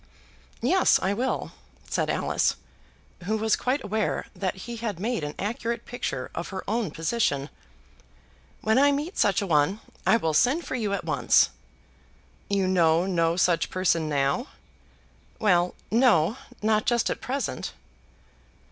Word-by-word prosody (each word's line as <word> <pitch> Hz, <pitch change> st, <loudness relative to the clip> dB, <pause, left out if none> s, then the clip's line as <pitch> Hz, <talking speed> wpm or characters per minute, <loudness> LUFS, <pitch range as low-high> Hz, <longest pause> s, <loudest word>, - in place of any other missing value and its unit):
"Yes, 375 Hz, -1 st, +4 dB
I 195 Hz, -, 0 dB
will," 250 Hz, +5 st, -2 dB, 0.4 s
said -, -, -1 dB
Alice, -, -, +1 dB, 0.7 s
who 215 Hz, +3 st, 0 dB
was 220 Hz, 0 st, +2 dB
quite 260 Hz, +3 st, -1 dB
aware 215 Hz, +1 st, -1 dB
that 190 Hz, -2 st, -2 dB
he 235 Hz, -1 st, -6 dB
had 215 Hz, -6 st, -4 dB
made 220 Hz, -4 st, -1 dB
an 150 Hz, 0 st, -4 dB
accurate 230 Hz, +3 st, -3 dB
picture 135 Hz, -, -4 dB
of 170 Hz, -, -4 dB
her 190 Hz, -1 st, -5 dB
own 220 Hz, -2 st, 0 dB
position. 155 Hz, -4 st, -1 dB, 1.1 s
"When 220 Hz, +4 st, +3 dB
I 285 Hz, +1 st, +5 dB
meet 295 Hz, +6 st, -3 dB
such 200 Hz, 0 st, +3 dB
a -, -, -2 dB
one, 165 Hz, +4 st, +2 dB, 0.3 s
I 225 Hz, -, +6 dB
will 160 Hz, -8 st, -1 dB
send 260 Hz, -, +3 dB
for -, -, -5 dB
you 220 Hz, -5 st, -1 dB
at 200 Hz, -, -3 dB
once." -, -, +3 dB, 1.0 s
"You 200 Hz, -2 st, +1 dB
know 170 Hz, -2 st, +3 dB
no 170 Hz, -3 st, +1 dB
such 175 Hz, -2 st, +2 dB
person 170 Hz, -4 st, +1 dB
now?" 140 Hz, -1 st, 0 dB, 0.9 s
"Well, 180 Hz, -4 st, +2 dB, 0.2 s
no; 225 Hz, -6 st, +4 dB, 0.3 s
not 215 Hz, 0 st, +2 dB
just 235 Hz, -2 st, +2 dB
at -, -, -4 dB
present." 260 Hz, +3 st, -3 dB
205 Hz, 145 wpm, -26 LUFS, 170-235 Hz, 1.1 s, I